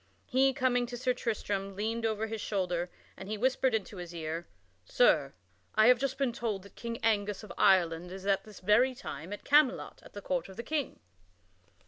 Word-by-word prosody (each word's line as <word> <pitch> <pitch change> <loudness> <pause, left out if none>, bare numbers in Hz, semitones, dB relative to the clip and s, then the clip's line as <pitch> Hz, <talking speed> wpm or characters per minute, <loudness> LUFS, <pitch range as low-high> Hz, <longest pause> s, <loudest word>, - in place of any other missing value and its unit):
He, 265 +1 +3
coming 250 -2 +1
to 245 0 -6
Sir 250 +1 +1
Tristram, 200 -5 -3
leaned 225 +3 -1
over 220 0 -1
his 220 -1 -5
shoulder 180 -3 -1 0.3
and 190 - -9
he 215 - -2
whispered 260 +1 +2
into 205 -2 -4
his 175 -1 -7
ear: 165 +1 -4 0.4
"Sir, 140 - +3 0.4
I 215 0 +6
have 250 -1 +6
just 270 0 -1
been 270 -3 0
told 220 -5 -3
that 200 - -15
King 235 -1 -5
Angus 210 -2 +1
of 200 -5 -9
Ireland 175 -2 +3
is 190 0 -8
at 195 -1 +2
this 210 -3 -13
very 235 +7 +4
time 170 - -7
at 205 - -6
Camelot 290 -2 +3
at - - -16
the 205 - -7
court 180 0 -2
of 190 - -12
the 235 - -4
King." 295 +2 -2
215 Hz, 195 wpm, -31 LUFS, 190-245 Hz, 0.4 s, I